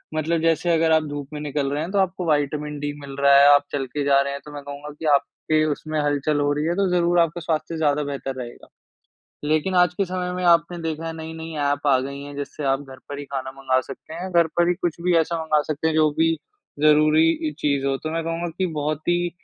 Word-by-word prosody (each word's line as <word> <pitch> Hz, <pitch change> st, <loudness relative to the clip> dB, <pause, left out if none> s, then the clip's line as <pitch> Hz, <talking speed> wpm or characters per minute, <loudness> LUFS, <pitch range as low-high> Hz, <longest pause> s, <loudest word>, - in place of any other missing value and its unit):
मतलब 160 Hz, +1 st, 0 dB
जैसे 165 Hz, +1 st, +1 dB
अगर 165 Hz, 0 st, +3 dB
आप 160 Hz, 0 st, +4 dB
धूप 145 Hz, -1 st, -5 dB
में 150 Hz, -, -5 dB
निकल 145 Hz, -1 st, -2 dB
रहे 145 Hz, -, -1 dB
हैं 165 Hz, +4 st, -4 dB
तो 200 Hz, -, +1 dB
आपको 190 Hz, -1 st, 0 dB
विटामिन 150 Hz, 0 st, -2 dB
डी 145 Hz, 0 st, -2 dB
मिल 140 Hz, -1 st, -8 dB
रहा 140 Hz, 0 st, +5 dB
है 140 Hz, -, +7 dB
आप 145 Hz, 0 st, +5 dB
चल 135 Hz, -2 st, -2 dB
के 145 Hz, +3 st, -3 dB
जा 140 Hz, -1 st, +4 dB
रहे 140 Hz, 0 st, -2 dB
हैं 140 Hz, -, -5 dB
तो 150 Hz, -, -10 dB
मैं 145 Hz, -, -6 dB
कहूँगा 145 Hz, +1 st, -8 dB
कि -, -, -6 dB
आपके 155 Hz, +2 st, +1 dB
उसमें 155 Hz, +1 st, -3 dB
हलचल 145 Hz, 0 st, 0 dB
हो 145 Hz, 0 st, +1 dB
रही 150 Hz, +1 st, -1 dB
है 170 Hz, +1 st, 0 dB
तो 195 Hz, 0 st, +1 dB
ज़रूर 175 Hz, 0 st, +3 dB
आपका 170 Hz, +1 st, +1 dB
स्वास्थ्य 160 Hz, 0 st, -2 dB
ज़्यादा 150 Hz, -1 st, +1 dB
बेहतर 135 Hz, -2 st, -4 dB
रहेगा। 120 Hz, -1 st, -10 dB, 0.8 s
लेकिन 155 Hz, +5 st, +1 dB
आज 180 Hz, -1 st, +4 dB
के 195 Hz, -, 0 dB
समय 180 Hz, -1 st, -3 dB
में 180 Hz, 0 st, -3 dB
आपने 170 Hz, 0 st, +3 dB
देखा 160 Hz, 0 st, -3 dB
है 165 Hz, -, -3 dB
नई-नई 160 Hz, 0 st, -7 dB
ऐप 145 Hz, 0 st, 0 dB
आ 135 Hz, -2 st, +5 dB
गई 140 Hz, +1 st, -6 dB
हैं, 145 Hz, 0 st, -9 dB
जिससे 145 Hz, +1 st, -5 dB
आप 135 Hz, 0 st, +1 dB
घर 135 Hz, -2 st, -11 dB
पर 145 Hz, -, -6 dB
ही 145 Hz, -, -6 dB
खाना 135 Hz, -1 st, -5 dB
मँगा 130 Hz, -1 st, 0 dB
सकते 135 Hz, +4 st, -10 dB
हैं, 180 Hz, +3 st, -5 dB
घर 170 Hz, -1 st, +4 dB
पर 175 Hz, 0 st, +3 dB
ही 175 Hz, -, +3 dB
कुछ 175 Hz, -3 st, -2 dB
भी 180 Hz, 0 st, +2 dB
ऐसा 165 Hz, +1 st, 0 dB
मँगा 155 Hz, -1 st, +2 dB
सकते 155 Hz, +2 st, -2 dB
हैं 160 Hz, -, -1 dB
जो 155 Hz, -1 st, +4 dB
भी 165 Hz, 0 st, +4 dB, 0.5 s
ज़रूरी 155 Hz, +1 st, +5 dB, 0.2 s
इ 150 Hz, -, -4 dB
चीज़ 140 Hz, -2 st, 0 dB
हो। 135 Hz, 0 st, +1 dB
तो 155 Hz, +3 st, -5 dB
मैं 165 Hz, 0 st, -1 dB
कहूँगा 165 Hz, +1 st, -2 dB
कि 190 Hz, -, +1 dB
बहुत 150 Hz, +1 st, -1 dB
ही 175 Hz, 0 st, +1 dB
155 Hz, 255 wpm, -23 LUFS, 145-165 Hz, 0.8 s, है